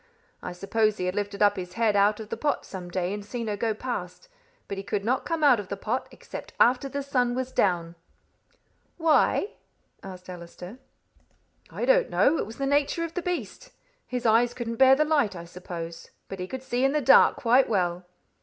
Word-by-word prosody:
I - - -6
suppose 215 +4 0
he 180 - -2
had 180 - -1
lifted 205 0 -2
up 205 -1 +4
his 180 -1 -6
head 225 -1 +1
out 205 +1 +3
of 220 -1 -8
the - - -3
pot 295 -1 -1
some 180 -2 -8
day 180 +1 -2
and 205 0 -5
seen 235 +3 -5
her 210 -1 -2
go 220 +1 -1
past, 255 - -6 0.4
but 200 - -5
he - - -6
could 200 0 -3
not 255 +3 0
come 330 -2 -2
out 265 -6 +6
of 205 - -6
the 200 - -5
pot 230 +6 -2
except - - -10
after 255 +3 +3
the 280 +1 -4
sun 250 -3 0
was 260 0 -3
down." 175 -7 0 1.0
"Why?" 325 +4 +3 0.5
asked 185 -1 -10
Allister. 180 +5 -10 0.9
"I - - -3
don't - - +3
know. 320 - +3
It - - -2
was 225 - -10
the 275 - -2
nature 285 +4 +1
of 335 -1 -5
the 360 - -2
beast. 360 +7 -5 0.4
His 250 -1 -4
eyes 235 +2 +3
couldn't 230 -2 -4
bear 265 +1 +7
the 305 +2 +2
light, 290 -10 +1
I 170 -1 -8
suppose; 170 -1 -8 0.2
but 195 - -7
he 180 - -4
could 260 +5 -7
see 250 -1 -1
in 270 +1 +3
the 300 - +1
dark 270 - +6
quite 250 +2 +3
well. 180 -3 -1
225 Hz, 210 wpm, -26 LUFS, 190-265 Hz, 1.0 s, bear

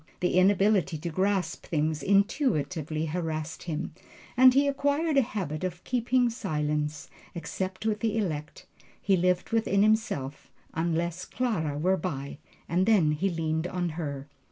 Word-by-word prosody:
The 180 - 0
inability 190 -1 +3
to 170 +3 -4
grasp 185 -1 -1
things 155 -1 0
intuitively 165 - +1
harassed 160 -1 -3
him, 165 -1 -4 0.4
and 255 +1 +8
he 280 +2 +3
acquired 285 +3 +1
a 275 - +6
habit 185 - -4
of 180 -1 -4
keeping 245 0 +1
silence, 150 -7 -2 0.3
except 185 +4 -4
with 215 -1 0
the 225 0 0
elect. 160 -7 -3 0.3
He 195 - +2
lived 180 +2 +1
within 210 -3 +2
himself, 210 - 0 0.2
unless 170 +2 -1
Clara 165 - -1
were 185 +5 +2
by, 140 -6 -5 0.3
and 180 +3 +1
then 190 -9 +4
he 180 +6 0
leaned 160 -1 -1
on 180 -1 -2
her. 145 -4 -5
180 Hz, 140 wpm, -28 LUFS, 155-210 Hz, 0.4 s, and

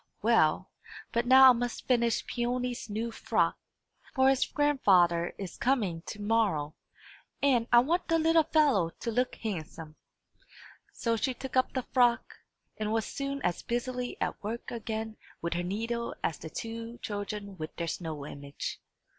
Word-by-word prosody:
Well; - - +3 0.4
but 235 0 0
now 260 0 +9
I - - +4
must 245 0 -3
finish 235 -2 +2
Peony's 245 -1 -2
new 225 +3 -2
frock, - - 0 0.6
for 265 0 +5
his 270 -1 +2
grandfather 185 -13 +3
is 190 -3 -7
coming 210 -11 0
to 210 - -6
morrow, 205 -9 +1 0.7
and 245 -5 +3
I 240 0 +8
want 335 +8 0
the 330 - +3
little 325 0 +4
fellow 285 - +3
to 230 - -3
look 250 +2 0
handsome." 160 -6 -6 0.9
So 230 -1 -1
she 250 +3 -1
took 265 +2 -7
up 255 - +2
the 260 - -1
frock, 245 -1 +1 0.4
and 215 0 -2
was 225 -1 0
soon 275 0 -4
as 175 -1 0
busily 245 +1 -3
at - - -2
work 225 +3 -5
again 220 -1 -4 0.2
with 170 0 -2
her 175 - -1
needle 230 +6 -3
as 160 - -1
the 160 - -7
two 230 +4 -6
children 205 -1 -5
with 155 - -6
their 170 - -3
snow 155 -4 -4
image. 140 -1 -6
230 Hz, 155 wpm, -30 LUFS, 195-255 Hz, 0.9 s, now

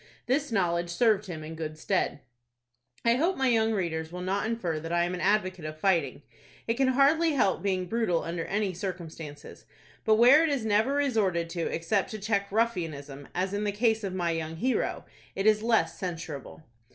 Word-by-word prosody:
This 275 +2 0
knowledge 175 -4 +1
served 210 +2 +2
him 160 -4 -6
in 155 +1 -7
good 155 -1 -5
stead. 160 -4 -1 0.8
I 235 +1 +4
hope 345 +7 +1
my 265 -1 +2
young 225 -1 +3
readers 165 -6 -2
will 180 +1 -6
not 195 +3 -1
infer 185 -9 -2
that 165 +2 -6
I 170 0 +2
am 175 +1 -1
an 180 - -4
advocate 185 -4 +1
of 155 0 -6
fighting. 160 -7 +1 0.4
It 230 - +2
can 265 +2 +1
hardly 290 +5 +4
help 225 -9 +2
being 185 -2 0
brutal 200 -4 0
under 165 0 -3
any 200 -2 -1
circumstances; 165 -5 -7 0.4
but 220 -1 +4
where 250 +7 +7
it 325 - +2
is 275 -6 -1
never 220 +5 +2
resorted 200 -12 +1
to 170 -2 -2
except 170 +4 0
to 215 - -5
check 200 -1 -1
ruffianism, 160 -11 -2
as 185 +2 -1
in 205 +1 -1
the 205 - 0
case 220 +1 +1
of 190 -2 -3
my 175 -2 0
young 160 -1 -3
hero, 250 +9 -1 0.3
it 195 - -2
is 215 -1 +4
less 225 0 +1
censurable. 165 -5 -6
195 Hz, 190 wpm, -28 LUFS, 165-225 Hz, 0.8 s, where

